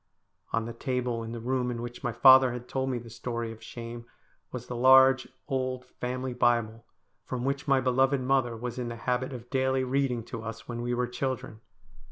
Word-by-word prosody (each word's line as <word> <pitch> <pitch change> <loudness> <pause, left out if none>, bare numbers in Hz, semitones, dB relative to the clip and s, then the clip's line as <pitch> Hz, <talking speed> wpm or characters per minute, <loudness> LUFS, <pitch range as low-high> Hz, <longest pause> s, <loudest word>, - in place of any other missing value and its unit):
On 115 -1 0
the 115 - -6
table 125 -1 -2
in 115 0 -6
the 120 - -5
room 125 +1 -1
in 120 -1 -3
which 120 +1 -7
my 120 - 0
father 130 0 +7
had 125 0 -7
told 135 0 -1
me 125 - -1
the 115 -1 -9
story 115 0 -4
of 110 0 -11
shame 115 0 -8 0.5
was - - -6
the 125 - -6
large 130 +1 +6 0.2
old 130 -1 -2
family 125 0 -4
Bible, 115 -2 +1 0.4
from 125 -1 -4
which 140 +1 -2
my 135 -1 +4
beloved 130 +2 +2
mother 130 -3 +1
was 120 +1 -5
in 125 - -3
the 120 - -5
habit 125 +3 -1
of 120 -2 -9
daily 130 0 +1
reading 130 -2 0
to 115 -1 -7
us 115 0 -7
when 120 -1 -4
we 120 0 -1
were 125 0 +1
children. 125 -3 -4
125 Hz, 205 wpm, -28 LUFS, 120-130 Hz, 0.5 s, father